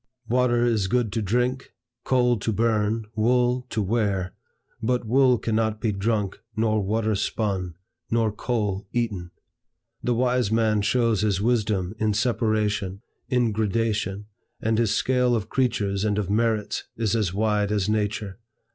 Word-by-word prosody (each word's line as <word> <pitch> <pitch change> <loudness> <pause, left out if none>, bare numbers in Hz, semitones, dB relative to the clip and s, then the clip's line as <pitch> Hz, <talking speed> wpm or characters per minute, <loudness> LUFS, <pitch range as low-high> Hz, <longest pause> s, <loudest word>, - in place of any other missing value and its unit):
Water 120 0 +2
is 110 -5 +1
good 120 -1 0
to 115 - 0
drink, 125 +5 -1 0.3
coal 125 -2 +3
to 110 - -1
burn, 110 0 +1
wool 125 +2 +2
to 110 - -1
wear; 100 -3 0 0.5
but 125 +1 0
wool 125 +2 +4
cannot 110 -1 -1
be 110 -2 0
drunk, 100 0 -1 0.2
nor 110 -1 +1
water 110 +2 0
spun, 95 -4 -2 0.3
nor 115 -2 +2
coal 105 -3 -2
eaten. 105 -8 -2 0.7
The 120 - 0
wise 125 -2 +1
man 110 -2 +2
shows 115 -1 +2
his 105 -3 +1
wisdom 105 -4 0
in 110 -1 +1
separation, 105 -4 0 0.3
in 120 -3 +2
gradation, 105 -2 -1 0.3
and 110 0 0
his 115 -3 +2
scale 125 +2 +2
of 110 -1 -3
creatures 105 -6 0
and 105 -1 +1
of 100 -2 -1
merits 110 -1 0
is 115 -1 0
as 105 -6 +1
wide 105 0 +1
as 105 -2 0
nature. 105 -1 -2
110 Hz, 145 wpm, -25 LUFS, 105-120 Hz, 0.7 s, wool